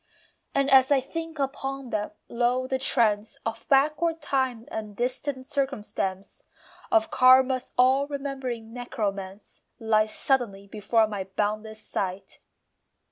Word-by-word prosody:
And 275 0 +2
as 265 0 +6
I 280 - +5
think 325 +4 -6
upon 270 -1 -3
them, 210 0 -1 0.2
lo, 245 +2 0
the 260 0 -2
trance 220 -5 +2
Of 225 0 -5
backward 305 +4 +3
time 260 -6 -1
and 215 -2 -5
distant 260 +2 -2
circumstance, 215 -9 -3 0.5
Of 330 -2 +3
Karma's 255 0 +5
all 260 +3 +4
remembering 265 -5 -5
necromance, 200 -5 -5 0.2
Lies 215 -1 +2
suddenly 230 -8 0
before 220 +2 +1
my 205 -3 -4
boundless 215 +3 -3
sight. 190 0 -4
250 Hz, 120 wpm, -26 LUFS, 215-270 Hz, 0.5 s, as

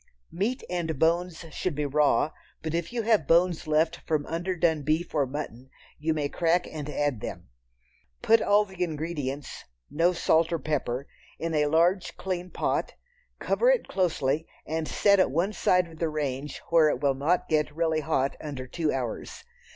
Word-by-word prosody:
Meat 220 +9 -1
and 170 -4 -2
bones 170 +2 +1
should 180 -1 -2
be 150 0 -1
raw, 150 +1 +2 0.3
but 160 0 -3
if 170 0 -2
you 235 -2 -2
have 215 -9 +2
bones 170 -1 +3
left 155 +1 +2
from 150 -2 0
underdone 170 -2 0
beef 155 +4 -1
or 145 -4 +2
mutton, 130 -2 -6 0.3
you 160 +2 0
may 150 -2 0
crack 170 +3 +1
and 150 -2 -6
add 145 -5 -1
them. 85 - -7 0.7
Put 225 0 +5
all 205 +1 +4
the 190 -2 -4
ingredients 150 -4 -4 0.3
(no 165 +4 +3
salt 165 -1 +2
or 170 - +1
pepper) 140 -3 -2 0.3
in 165 0 -3
a 150 -1 +2
large 170 +5 +2
clean 180 -1 -3
pot, - - -1 0.4
cover - - +2
it - - +2
closely 160 -5 0 0.2
and 160 0 -2
set 200 -1 +4
at - - +4
one 170 +9 0
side 180 -1 +2
of 160 -1 -14
the 165 - 0
range 145 -2 -3
where 165 -2 +6
it 125 - -1
will 140 -1 +2
not 150 +7 +1
get 155 -1 +1
really 160 -1 +1
hot 135 -2 0
under 140 -4 -5
two 155 +4 -1
hours. 125 -4 -4
160 Hz, 175 wpm, -27 LUFS, 145-175 Hz, 0.7 s, where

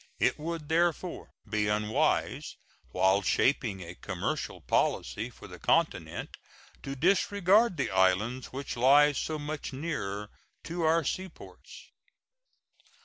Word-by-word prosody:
It - - +1
would, 165 -1 -4
therefore, 170 +2 0 0.2
be 105 0 0
unwise, 105 +1 0 0.3
while 95 +1 +3
shaping 105 -2 +1
a 85 +1 -8
commercial - - -4
policy - - 0
for - - -14
the - - -11
continent, - - 0 0.4
to 135 - -5
disregard 195 - +3
the 140 - -1
islands 95 +7 +2
which 135 +1 -6
lie 140 +4 +6
so 155 +2 -3
much 150 -1 -5
nearer 105 -9 -4 0.3
to 170 +1 -4
our 165 +1 +3
seaports. 190 - -7
140 Hz, 115 wpm, -29 LUFS, 105-165 Hz, 0.4 s, lie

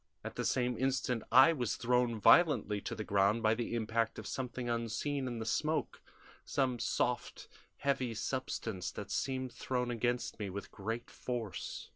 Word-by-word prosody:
At - - -5
the - - -2
same 125 -1 +1
instant 125 -3 0
I 130 +7 +8
was 125 -7 -1
thrown 125 -1 +1
violently 140 - +5
to - - -4
the 110 - -4
ground 100 +3 +2
by 110 0 +5
the 120 0 -2
impact 115 0 0
of - - -7
something 125 -1 -4
unseen 120 +4 -1
in 120 -2 -3
the 110 - -4
smoke 155 +7 -1 0.4
some 130 -3 0
soft, - - -1 0.3
heavy 130 -4 0
substance 110 - -3
that - - -7
seemed 130 -1 -2
thrown 125 -1 -2
against 120 0 -1
me 105 -2 -3
with 100 +1 -6
great 115 +4 -4
force. 120 -6 -5
120 Hz, 160 wpm, -34 LUFS, 110-130 Hz, 0.4 s, I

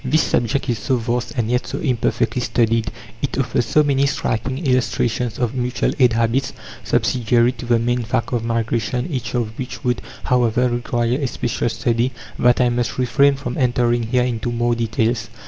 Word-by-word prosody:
(7) - - -4
This 155 +1 +4
subject 120 +4 0
is 120 -4 -1
so 130 - 0
vast, 120 +1 -2
and 115 -2 0
yet 125 +2 0
so - - -4
imperfectly 120 -2 0
studied; 115 -3 +1 0.3
it - - -2
offers 115 - 0
so 150 - +4
many 140 -1 +2
striking 130 -1 -2
illustrations 125 -2 0
of 120 -1 -1
mutual 125 -1 -1
aid 125 -3 +5
habits, 115 +4 0 0.3
subsidiary 120 0 +2
to 120 -1 -9
the 120 -1 +4
main 120 +2 0
fact 120 +1 -2
of 120 -2 0
migration 115 +1 -1
each 125 -5 -3
of 115 -2 -2
which 130 +3 -6
would, 125 -2 0 0.2
however, 125 0 +2
require 120 +1 -1
a 140 - 0
special 120 -1 -2
study 120 +2 0 0.3
that 120 0 +4
I 125 -1 +4
must 120 -1 -1
refrain 130 +3 +3
from 135 -2 -5
entering 120 -2 +2
here 125 +2 +1
into 120 -1 -2
more 120 0 +1
details. 115 0 -1
120 Hz, 180 wpm, -20 LUFS, 115-125 Hz, 0.3 s, aid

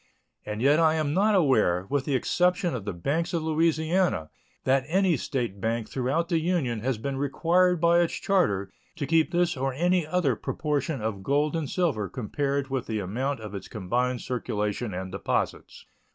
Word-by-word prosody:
And 105 +2 -3
yet 145 +3 +5
I 160 -1 +4
am 155 -2 0
not 205 +4 +3
aware, 110 - +3
with 140 -2 0
the 140 - 0
exception 180 - +1
of 110 -6 -4
the 105 - -2
banks 155 - -1
of 165 - -1
Louisiana, 160 - +1 0.3
that 135 0 +2
any 185 +1 +3
State 120 -7 -3
bank 115 +1 -1
throughout 135 +6 -1
the 165 -2 +1
Union 160 -9 0
has 125 +2 -1
been 135 +4 -3
required 170 +6 +2
by 170 +1 +4
its 170 -1 +1
charter 100 - +1 0.2
to 140 - -3
keep 160 0 +3
this 175 -1 +1
or 135 0 -2
any 175 +1 +1
other 155 -7 +1
proportion 145 -1 -2
of 105 -3 -3
gold 145 - +1
and 155 -5 -2
silver 145 - 0
compared 140 +3 -2
with 130 -3 -2
the 110 - -2
amount 120 +7 -2
of 105 -2 -8
its 100 - -6
combined 120 +4 -1
circulation 105 -2 -2
and 95 0 -5
deposits. 100 - -3
140 Hz, 180 wpm, -27 LUFS, 115-165 Hz, 0.3 s, yet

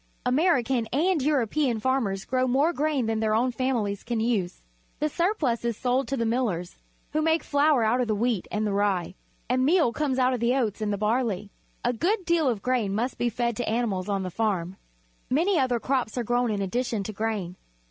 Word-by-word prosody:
American 255 -4 +2
and 320 +6 +1
European 265 -3 +1
farmers 215 -6 0
grow 255 0 +1
more 280 +7 +2
grain 295 -4 0
than 220 0 -1
their 215 -1 +1
own 250 +3 +2
families 235 -6 -1
can 235 -1 -2
use. 220 - -1 0.3
The 305 - 0
surplus 315 - 0
is 235 -2 -1
sold 255 +2 0
to 275 - -2
the 230 - 0
millers, 225 -7 -1 0.4
who 310 - 0
make 320 +1 +2
flour 285 -3 +3
out 235 +3 +2
of 245 - -1
the 215 - +1
wheat 225 -2 0
and 215 0 -1
the 205 - -1
rye, 195 -3 0 0.3
and 255 +2 +1
meal 310 -4 +3
out 260 -3 +2
of 250 - -2
the 235 +2 +2
oats 225 -5 -1
and 210 -1 0
the 205 - -1
barley. 210 -2 -1 0.3
A 245 - +2
good 370 - 0
deal 335 -5 +2
of 235 - 0
the - - -17
grain 235 -6 0
must 240 +4 -2
be 240 - +1
fed 235 0 -1
to 245 - -2
animals 215 -5 -1
on 195 -1 0
the 185 - -4
farm. 190 -4 -1 0.5
Many 335 +7 +2
other 250 -3 +1
crops 255 -2 -1
are 245 - 0
grown 240 +1 +1
in 205 -2 -1
addition 230 +1 -1
to 215 - -6
grain. 205 -4 -3
240 Hz, 210 wpm, -26 LUFS, 215-265 Hz, 0.5 s, flour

